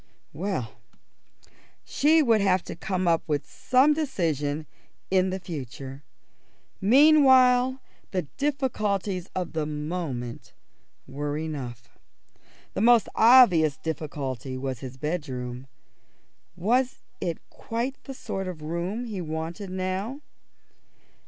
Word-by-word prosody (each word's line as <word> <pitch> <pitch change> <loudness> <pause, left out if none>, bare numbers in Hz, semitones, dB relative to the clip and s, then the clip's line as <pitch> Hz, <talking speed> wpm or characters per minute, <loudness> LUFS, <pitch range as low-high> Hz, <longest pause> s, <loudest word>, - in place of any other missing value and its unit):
Well, 165 - -3 1.1
she 310 +2 +4
would 225 -5 +4
have 190 -2 +2
to - - -7
come 185 +1 -2
to 160 -3 +1
some 265 +4 +3
decision 160 - -1 0.5
in 190 0 +3
the 190 +1 -3
future. 135 -5 -7 0.8
Meanwhile 260 0 +6 0.3
the 185 -3 -1
difficulties 210 - -1
of 180 -2 -3
the 155 -2 -1
moment 150 -6 -5 0.5
were 145 +2 -4
enough. 130 -7 -5 0.9
The - - -2
most 235 -2 +5
obvious 200 - +6
difficulty 140 -5 -4
was 130 -2 -4
his 130 0 -8
bedroom. 130 -5 -4 0.9
Was 245 +8 0 0.2
it 170 -2 -2
quite 240 +4 -4
the 270 - -7
sort 195 -6 -4
of 170 -4 -7
room 175 +9 -3
he 210 -5 -5
wanted 165 +5 -5
now? 190 +8 -3
180 Hz, 105 wpm, -26 LUFS, 150-230 Hz, 1.1 s, Meanwhile